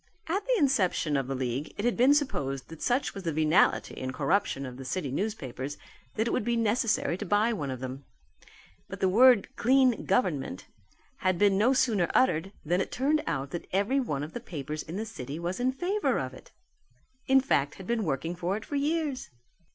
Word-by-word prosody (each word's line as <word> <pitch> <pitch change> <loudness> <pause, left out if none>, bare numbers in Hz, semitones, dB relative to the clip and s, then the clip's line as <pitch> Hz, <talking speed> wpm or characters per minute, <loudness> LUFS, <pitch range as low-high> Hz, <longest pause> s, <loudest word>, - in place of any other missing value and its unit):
At 385 +5 -1
the - - +3
inception 205 - +2
of 135 -2 0
the 135 - -2
league 130 +3 -3
it 205 - -2
has 240 - +3
been 260 +4 +5
supposed 140 - -2
that 165 -1 -11
such 255 +3 0
was 195 - -6
the 170 -3 -2
venality 155 +4 +2
and 130 0 -3
corruption 140 0 0
of 125 -1 -8
the 135 - -7
city 145 +1 -3
newspapers 145 - -4 0.4
that 220 - +1
it - - 0
would - - 0
be 235 +2 0
necessary 225 -5 +1
to - - -3
buy 210 +4 +2
one 145 -10 -3
of 130 -1 -5
them. 130 +1 -6 0.9
But 195 0 -7
the 190 - +2
word 240 +2 +5
"clean 255 0 +3
government" 150 - 0 0.5
had 185 -7 +1
been 200 +1 +4
no 225 +7 +4
sooner 230 -9 +2
uttered 195 -8 +2
than 175 +4 +1
it - - -4
turned 295 +4 +1
out 140 -4 -2
that 175 - -5
every 205 +9 +1
one 145 - -2
of 150 - -7
the - - -4
papers 155 - -5
in 160 - -8
the 215 +3 -3
city 145 - -7
was 175 +4 -3
in 255 +1 +2
favour 365 +10 0
of - - -3
it: - - -14 0.8
in 265 0 +6
fact 145 - +1
had 190 - -10
been 235 0 0
working 165 +2 -2
for 180 +3 -1
it 220 - -9
for 290 - -3
years. 295 -2 -1
195 Hz, 205 wpm, -28 LUFS, 150-245 Hz, 0.9 s, in